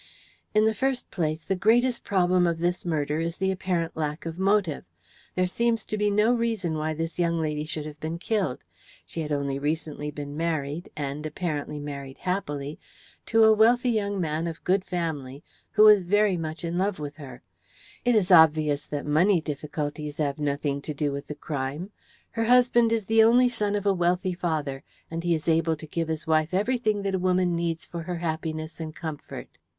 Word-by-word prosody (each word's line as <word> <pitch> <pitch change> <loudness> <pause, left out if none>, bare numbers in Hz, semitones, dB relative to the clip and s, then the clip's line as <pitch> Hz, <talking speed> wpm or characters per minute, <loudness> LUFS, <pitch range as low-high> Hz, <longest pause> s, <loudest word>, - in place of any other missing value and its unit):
"In 215 0 +5
the 220 - +3
first 260 +3 -1
place, 160 -2 -2
the 190 - 0
greatest 235 +6 +3
problem 180 -2 +3
of 170 -1 0
this 175 +1 -1
murder 150 -2 0
is 165 +1 -2
the 190 0 +1
apparent 180 -3 -2
lack 150 +1 -3
of 165 +1 -5
motive. 195 -5 +1 0.5
There 185 - +2
seems 230 +4 0
to - - -3
be 210 0 +1
no 210 +4 +3
reason 225 -8 -1
why 155 0 -2
this 165 +2 -4
young 170 -1 +1
lady 150 -1 -2
should 155 -1 -4
have 150 -1 -9
been 160 +2 -4
killed. 190 - -1 0.4
She 165 - -5
had 155 -1 -4
only 140 -1 -1
recently 150 0 -2
been 145 -1 -7
married, 160 0 -2
and, 145 0 -3
apparently, 150 -2 -3
married 140 -2 -7
happily, 150 -6 -3 0.5
to 225 -1 +4
a 220 0 +7
wealthy 240 +3 +4
young 205 -3 -1
man 160 -1 -1
of 165 -1 -6
good 185 +1 +2
family, 155 -7 -4 0.3
who 215 -1 +6
was 210 -2 +8
very 205 +2 +2
much 160 -1 -5
in 170 +1 -2
love 195 0 0
with 145 -1 -6
her. 130 -5 -10 0.6
It 245 -1 +3
is 200 -3 +2
obvious 155 -3 +5
that 145 -1 -4
money 170 +6 +4
difficulties 150 -1 -4
have 145 -2 -1
nothing 140 -1 -1
to 150 +1 -5
do 145 0 0
with 140 0 -5
the 150 - -6
crime. 145 +7 -4 0.4
Her 225 0 -1
husband 240 -1 +4
is 225 -3 0
the 225 +2 +4
only 245 +2 +5
son 210 -4 -1
of 205 -1 -2
a 200 - +4
wealthy 180 +1 +1
father, 155 -6 -2 0.3
and 165 0 -3
he 175 -1 +2
is 155 0 -6
able 165 0 +2
to 155 - -10
give 165 +1 -2
his 160 -1 -3
wife 160 +2 +1
everything 215 -1 +1
that 195 -1 -1
a 190 - +1
woman 180 -1 +2
needs 165 -1 -2
for 170 - -6
her 175 +1 -4
happiness 160 -1 -4
and 155 -1 -6
comfort. 160 -3 -7
165 Hz, 195 wpm, -26 LUFS, 150-200 Hz, 0.6 s, was